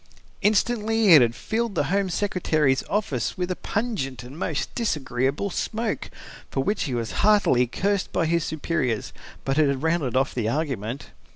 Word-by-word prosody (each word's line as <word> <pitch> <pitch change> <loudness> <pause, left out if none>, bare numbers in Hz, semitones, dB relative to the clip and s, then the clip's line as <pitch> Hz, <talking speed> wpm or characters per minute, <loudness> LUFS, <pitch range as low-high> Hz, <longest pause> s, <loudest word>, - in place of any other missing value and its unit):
Instantly 220 +1 +2
it 150 - +9
had 115 -1 +2
filled 225 - -2
the 160 - +2
Home 200 -1 +1
Secretary's 160 -7 +1
office 145 - -1
with 180 0 -2
a - - -1
pungent 200 - -3
and 125 +3 -10
most 160 -3 -3
disagreeable 145 - -1
smoke, 220 +4 -2 0.4
for 135 - -1
which 205 +1 0
he 130 -5 -2
was 115 -1 -2
heartily 200 -13 +4
cursed 200 - -1
by 170 - +1
his 170 0 +1
superiors. 145 -8 -2 0.3
But 135 +2 +1
it 155 - +5
had 140 +1 -2
rounded 160 -6 +1
off 135 +1 +1
the 115 -3 -1
argument. 135 -3 -3
160 Hz, 165 wpm, -24 LUFS, 130-200 Hz, 0.4 s, it